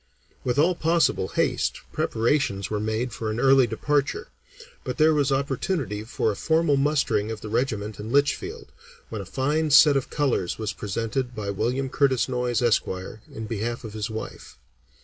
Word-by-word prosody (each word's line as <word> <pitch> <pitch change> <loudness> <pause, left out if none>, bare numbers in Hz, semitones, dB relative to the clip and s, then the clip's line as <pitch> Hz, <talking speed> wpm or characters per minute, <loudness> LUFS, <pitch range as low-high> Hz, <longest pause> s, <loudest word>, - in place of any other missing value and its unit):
With 125 0 -1
all 165 +5 +4
possible 165 - +1
haste, - - 0
preparations 110 -5 0
were 105 - 0
made 110 +3 -2
for 110 -1 -3
an 110 +2 -2
early 135 -1 +5
departure, 145 +6 -1 0.5
but 125 - -4
there 155 0 +5
was 145 -2 +1
opportunity 135 - -1
for 110 -1 -1
a - - -5
formal 160 +3 +2
mustering 135 -7 +1
of 110 -2 -5
the 105 - -7
regiment 110 -3 -2
in 110 +2 -6
Litchfield, 140 +1 0 0.4
when 110 -3 -5
a - - -8
fine 145 - 0
set 145 0 +7
of 135 - -1
colors 135 - 0
was 110 -2 -3
presented 115 +4 -3
by 100 -2 -3
William 125 +7 -1
Curtis 130 -2 +2
Noyes, 125 -2 -1
Esq., 120 -2 +3 0.4
in 110 - -6
behalf 115 +2 -3
of 110 -2 -7
his 110 +1 -3
wife. 110 0 -7
125 Hz, 170 wpm, -25 LUFS, 110-140 Hz, 0.5 s, set